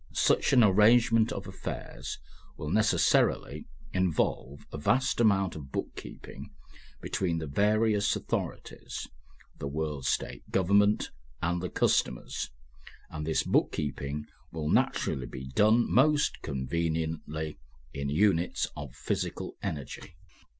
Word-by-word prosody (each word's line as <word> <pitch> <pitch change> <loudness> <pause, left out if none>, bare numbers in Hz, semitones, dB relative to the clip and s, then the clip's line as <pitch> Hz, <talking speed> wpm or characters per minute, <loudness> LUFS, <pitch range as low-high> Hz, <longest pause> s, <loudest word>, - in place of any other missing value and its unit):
Such - - +3
an 125 -3 +6
arrangement 110 +3 +5
of - - -5
affairs - - -6 0.4
will 75 - -4
necessarily 110 0 +2 0.3
involve 75 -6 -1
a 75 - -4
vast 125 - +2
amount 95 -5 +3
of 70 -3 -9
book - - -4
keeping - - -9 0.5
between 85 -3 -1
the 80 - -3
various 105 +6 +2
authorities, - - -4 0.5
the 70 - -3
World 75 -2 -3
State - - -2
government 100 +3 +3 0.3
and 85 +1 -1
the 90 - -3
customers, - - 0 0.6
and 75 0 -5
this 80 - +1
book - - +2
keeping 70 +1 -3 0.3
will 75 -2 -3
naturally 65 -2 +1
be 65 +2 -8
done 110 - +4
most 150 +4 +3
conveniently 80 +2 -3 0.3
in 70 0 -3
units 90 +2 +2
of 70 -3 -8
physical - - -3
energy. 75 +3 -6
80 Hz, 115 wpm, -29 LUFS, 75-105 Hz, 0.6 s, an